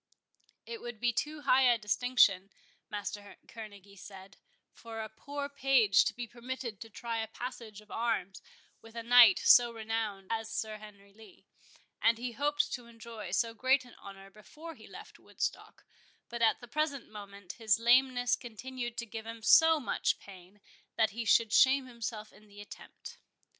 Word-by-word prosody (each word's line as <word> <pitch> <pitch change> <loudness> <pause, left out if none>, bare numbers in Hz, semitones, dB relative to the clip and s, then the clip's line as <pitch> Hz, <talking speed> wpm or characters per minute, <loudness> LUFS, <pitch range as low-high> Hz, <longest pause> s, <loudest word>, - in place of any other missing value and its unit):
It 460 -1 -8
would 240 -2 -8
be 240 0 +1
too 300 +5 -3
high 265 -2 +4
a 235 - +2
distinction, 210 -3 +2 0.4
Master 205 0 -6
Kerneguy 205 -3 -11
said, 195 0 -12 0.4
for 225 -1 -9
a 220 - -4
poor 285 +6 -6
page 270 -7 +3
to - - -2
be 245 - -5
permitted 240 -2 -7
to 225 - -9
try 230 +1 -5
a 220 - -3
passage 225 -2 -8
of 210 - -20
arms 225 -5 -2 0.4
with 225 0 -16
a 230 - -5
knight 235 -4 +7
so 240 -1 +6
renowned 220 -3 -4
as 225 -1 -2
Sir 220 -1 -4
Henry 200 -2 -15
Lee, 220 +1 -18 0.6
and 225 0 +4
he 245 +1 -4
hoped 295 +4 -1
to 245 -2 -6
enjoy 230 -3 -9
so 230 +5 0
great 260 +3 +2
an 245 - -16
honour 195 0 -12
before 305 +11 -12
he - - -15
left - - -13
Woodstock; - - -5 0.4
but 235 0 -6
at 230 - +3
the 240 - -11
present 285 -1 -2
moment 200 -3 -10
his 220 -3 +3
lameness 245 +1 +3
continued 240 +1 -7
to 235 - -3
give 225 0 -8
him 230 -1 -8
so 320 +6 +6
much 265 - -1
pain, 190 +1 -15 0.3
that 220 -1 +2
he 230 +2 -5
should 225 0 +3
shame 270 0 +5
himself 230 -3 -7
in 215 - -19
the 205 0 -16
attempt. 205 - -12
230 Hz, 170 wpm, -31 LUFS, 210-245 Hz, 0.6 s, knight